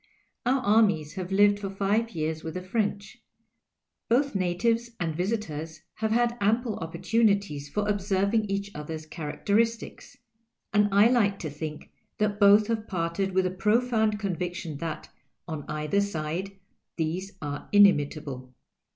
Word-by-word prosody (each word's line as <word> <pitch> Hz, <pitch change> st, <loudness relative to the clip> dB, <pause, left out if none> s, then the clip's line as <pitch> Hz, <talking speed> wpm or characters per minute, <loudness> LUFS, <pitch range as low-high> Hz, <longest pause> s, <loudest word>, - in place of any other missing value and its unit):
Our 260 Hz, +1 st, +3 dB
armies 200 Hz, -9 st, +3 dB
have 185 Hz, -1 st, -5 dB
lived 205 Hz, +1 st, +4 dB
for 200 Hz, -1 st, -4 dB
five 200 Hz, +4 st, 0 dB
years 155 Hz, 0 st, -2 dB
with 160 Hz, -1 st, -6 dB
the 185 Hz, -, -4 dB
French; 200 Hz, 0 st, -2 dB, 0.9 s
both 275 Hz, +4 st, +2 dB
natives 205 Hz, +6 st, 0 dB
and 165 Hz, -3 st, -2 dB
visitors 165 Hz, -5 st, -3 dB
have 220 Hz, 0 st, -2 dB
had 240 Hz, +1 st, +1 dB
ample 220 Hz, +2 st, +1 dB
opportunities 185 Hz, -3 st, 0 dB
for 210 Hz, +6 st, -1 dB
observing 200 Hz, +1 st, +1 dB
each 200 Hz, 0 st, -3 dB
other's 155 Hz, +1 st, -6 dB
charac 155 Hz, -1 st, -7 dB
teristics; 225 Hz, +2 st, 0 dB, 0.6 s
and 210 Hz, 0 st, +4 dB
I 200 Hz, +3 st, +6 dB
like 205 Hz, -6 st, +2 dB
to 155 Hz, -6 st, -5 dB
think 150 Hz, +1 st, -7 dB, 0.3 s
that 210 Hz, -1 st, 0 dB
both 205 Hz, +1 st, +7 dB
have 220 Hz, 0 st, -2 dB
parted 180 Hz, +2 st, -2 dB
with 190 Hz, 0 st, +3 dB
the 185 Hz, -, 0 dB
profound 220 Hz, +2 st, +1 dB
conviction 180 Hz, -5 st, -4 dB
that, 160 Hz, +1 st, -5 dB, 0.4 s
on 155 Hz, -4 st, -6 dB
cither 150 Hz, +6 st, 0 dB
side, 185 Hz, 0 st, -3 dB, 0.4 s
these 180 Hz, +5 st, -2 dB
arc 145 Hz, -1 st, -6 dB
inimitable. 145 Hz, -9 st, +3 dB
195 Hz, 140 wpm, -27 LUFS, 160-210 Hz, 0.9 s, both